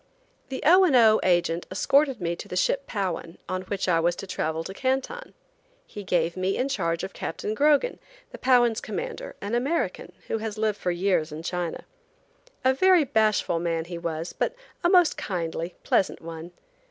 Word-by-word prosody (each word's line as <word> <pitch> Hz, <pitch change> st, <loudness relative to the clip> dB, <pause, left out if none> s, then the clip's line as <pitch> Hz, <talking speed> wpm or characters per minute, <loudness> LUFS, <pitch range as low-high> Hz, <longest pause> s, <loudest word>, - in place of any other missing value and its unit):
THE 265 Hz, -, -5 dB
O. 365 Hz, +5 st, +7 dB
and 325 Hz, -8 st, +4 dB
O. 220 Hz, -3 st, +6 dB
agent 175 Hz, -2 st, +1 dB
escorted 270 Hz, +7 st, +2 dB
me 170 Hz, -1 st, -2 dB
to -, -, -8 dB
the -, -, -6 dB
ship 275 Hz, +9 st, +1 dB
Powan, 185 Hz, -5 st, -3 dB
on 185 Hz, +1 st, -2 dB
which 195 Hz, 0 st, -3 dB
I 170 Hz, -2 st, +3 dB
was 170 Hz, +1 st, +1 dB
to -, -, -7 dB
travel 160 Hz, -3 st, -2 dB
to 190 Hz, -, -7 dB
Canton. 270 Hz, -, -2 dB, 0.5 s
He 205 Hz, -, -9 dB
gave 170 Hz, -2 st, 0 dB
me 185 Hz, +1 st, -1 dB
in 260 Hz, +2 st, 0 dB
charge 170 Hz, -11 st, -1 dB
of 195 Hz, -, -5 dB
Captain 210 Hz, -, -4 dB
Grogan, 295 Hz, -, +2 dB, 0.3 s
the -, -, -10 dB
Powan's 240 Hz, -3 st, +3 dB
commander, -, -, -5 dB
an 200 Hz, +3 st, -4 dB
American, 275 Hz, +8 st, -1 dB
who 225 Hz, -, -2 dB
has 215 Hz, -1 st, -5 dB
lived 215 Hz, -1 st, 0 dB
for -, -, -1 dB
years 175 Hz, -3 st, +1 dB
in 155 Hz, +2 st, -7 dB
China. 175 Hz, -1 st, -3 dB, 0.8 s
A 260 Hz, -, +5 dB
very 365 Hz, +4 st, +5 dB
bashful 215 Hz, -8 st, +1 dB
man 165 Hz, -1 st, -1 dB
he 170 Hz, 0 st, -6 dB
was, 165 Hz, 0 st, -4 dB
but -, -, -1 dB, 0.3 s
a 345 Hz, -, +4 dB
most 360 Hz, -3 st, +5 dB
kindly, 170 Hz, -2 st, -3 dB
pleasant 190 Hz, -, +1 dB
one. 165 Hz, +1 st, -8 dB
195 Hz, 180 wpm, -26 LUFS, 170-265 Hz, 0.8 s, O